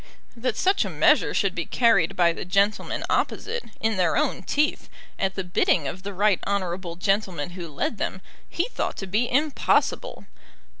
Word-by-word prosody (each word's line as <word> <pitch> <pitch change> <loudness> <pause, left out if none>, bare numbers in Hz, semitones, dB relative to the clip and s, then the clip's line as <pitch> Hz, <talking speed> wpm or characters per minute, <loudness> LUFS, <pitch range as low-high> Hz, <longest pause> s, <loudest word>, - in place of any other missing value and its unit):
That 235 -1 -2
such 385 +1 +2
a - - -4
measure - - +3
should - - +1
be - - -4
carried 210 -7 +3
by 170 -2 +3
the - - -6
gentlemen 200 +3 0
opposite, 470 +1 -1
in 220 -2 0
their 175 -3 +2
own 300 -2 0
teeth, 300 +1 0 0.3
at 190 0 0
the 190 - -2
bidding 175 -4 +1
of 180 +7 -6
the 200 +1 -5
right 200 0 +2
honourable 185 -3 -2
gentleman 180 -3 -1
who 175 -2 -7
led 155 +8 -3
them, 190 - -2 0.3
he 345 - -1
thought - - -3
to 195 - -4
be 215 +6 0
impossible. 290 +3 +1
195 Hz, 170 wpm, -25 LUFS, 180-230 Hz, 0.3 s, measure